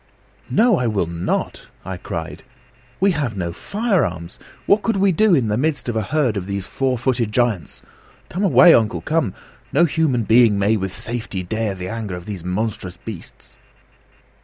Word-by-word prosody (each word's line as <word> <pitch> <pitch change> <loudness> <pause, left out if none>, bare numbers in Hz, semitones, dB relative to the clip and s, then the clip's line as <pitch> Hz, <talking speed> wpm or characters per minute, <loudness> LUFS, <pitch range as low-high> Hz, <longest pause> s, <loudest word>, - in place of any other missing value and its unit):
"No, 225 -4 +3
I 125 - 0
will 105 -5 0
not!" 85 +1 -3 0.2
I 95 0 -5
cried. 80 -2 -6 0.6
"We 195 +1 +4
have 140 - -2
no 85 -2 -3
firearms. 130 - -2 0.3
What 205 +1 +4
could 225 -2 0
we 195 0 +3
do 200 +2 +4
in 125 -7 +1
the 105 +2 0
midst 155 -1 -1
of 120 - -2
a 110 - +1
herd 125 0 0
of 95 -1 -4
these 100 -1 -3
four 130 +2 -1
footed 120 -2 0
giants? 105 - -1 0.4
Come 180 - -4
away, 180 -2 +7
uncle 115 -1 +2
come! 150 - -1 0.4
No 170 +5 +4
human 150 -7 +1
being 110 -1 +5
may 100 +3 +2
with 95 -3 -2
safety 110 -1 -4
dare 110 +2 -2
the 90 -1 -6
anger 110 -3 -4
of 90 0 -9
these 100 -5 -6
monstrous 90 -1 -3
beasts." 95 -2 -10
115 Hz, 175 wpm, -20 LUFS, 95-150 Hz, 0.6 s, away